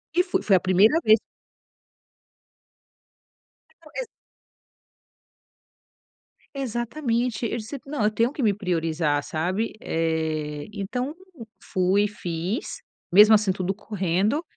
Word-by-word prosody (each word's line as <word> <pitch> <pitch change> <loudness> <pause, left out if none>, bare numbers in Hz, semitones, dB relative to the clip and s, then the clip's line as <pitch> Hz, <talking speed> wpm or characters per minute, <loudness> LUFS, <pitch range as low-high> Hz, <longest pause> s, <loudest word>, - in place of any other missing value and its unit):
E 360 - +5
fu 380 - -4
foi 195 - +6
a 180 - -5
primeira 205 - +5
vez 215 +1 +7 2.6
Não - - -17
ex - - -3 2.5
Exatamente. 240 -2 -2
Eu 235 - -3
disse: 235 +5 -6
"Não, 275 -5 -2
eu 210 - +3
tenho 230 +4 +1
que 290 - -5
me 210 -3 +3
priorizar", 165 -6 0
sabe, 185 +8 -2
eh. 160 -2 -2
Então 250 +8 -3 0.5
fui, 190 +3 +1
fiz, 180 +1 -4 0.3
mesmo 210 +3 +8
assim, 210 -2 +2
tudo 185 0 -2
correndo. 200 - -1
205 Hz, 105 wpm, -24 LUFS, 175-235 Hz, 2.6 s, mesmo